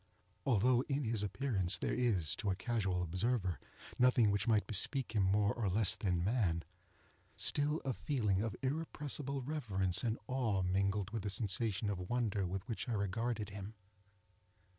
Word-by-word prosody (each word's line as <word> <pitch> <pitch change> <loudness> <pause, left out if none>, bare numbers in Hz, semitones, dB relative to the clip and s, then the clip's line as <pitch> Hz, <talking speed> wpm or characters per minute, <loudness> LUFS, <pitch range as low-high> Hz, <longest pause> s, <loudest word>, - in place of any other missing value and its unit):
Although 125 +1 +4
in 140 +1 0
his 115 -3 0
appearance 100 -2 0
there - - -2
is, 105 -11 +2
to 105 - -2
a 95 - +1
casual 95 -5 -1
observer, 95 - -1 0.4
nothing 125 -4 +5
which 100 +2 -1
might 110 -2 +3
bespeak 120 +4 +2
him 110 -2 +1
more 100 +2 +2
or 110 -5 -1
less 105 +1 +3
than 90 -4 -1
man, 95 -6 +1 0.7
still, 150 +2 +3
a 135 - 0
feeling 105 -9 0
of 110 -1 -2
irrepressible 140 -1 -2
reverence 100 - -1
and 115 -2 0
awe 115 -7 0
mingled 100 +2 0
with 115 -1 -3
the 100 - -3
sensation 105 0 -1
of 90 -2 -5
wonder 110 -6 0
with 95 +3 -5
which 120 +1 -4
I - - 0
regarded 105 +1 -2
him. 100 +2 -7
105 Hz, 160 wpm, -35 LUFS, 95-125 Hz, 0.7 s, nothing